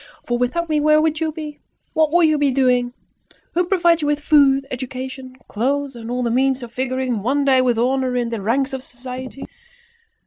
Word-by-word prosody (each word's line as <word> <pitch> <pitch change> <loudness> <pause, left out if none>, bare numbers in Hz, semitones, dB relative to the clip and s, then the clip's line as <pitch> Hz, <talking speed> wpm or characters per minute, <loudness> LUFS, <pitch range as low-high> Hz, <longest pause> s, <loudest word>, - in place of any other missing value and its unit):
For 240 0 -1
without 335 +8 -1
me 305 -1 +1
where 305 +1 +4
would 310 0 +1
you 320 -1 -1
be? 300 -1 -8 0.3
What 315 -1 +2
would 345 -1 +5
you 310 -1 +1
be 290 -1 +3
doing? 250 -2 +2 0.6
Who 355 +1 +1
provides 345 -3 +2
you 295 - -1
with 295 0 +1
food, 280 -2 +4
education, 260 0 -6
clothes, 275 +4 -1
and 230 -1 -8
all 250 +1 -2
the 235 - 0
means 260 +1 +1
of 235 - -9
figuring 255 -3 -2
one 275 +6 0
day 260 -2 +4
with 245 -2 +1
honour 255 +1 0
in 240 -1 0
the 230 -3 -4
ranks 265 +7 0
of 265 - -4
society? 255 +1 -8
265 Hz, 200 wpm, -20 LUFS, 250-295 Hz, 0.6 s, would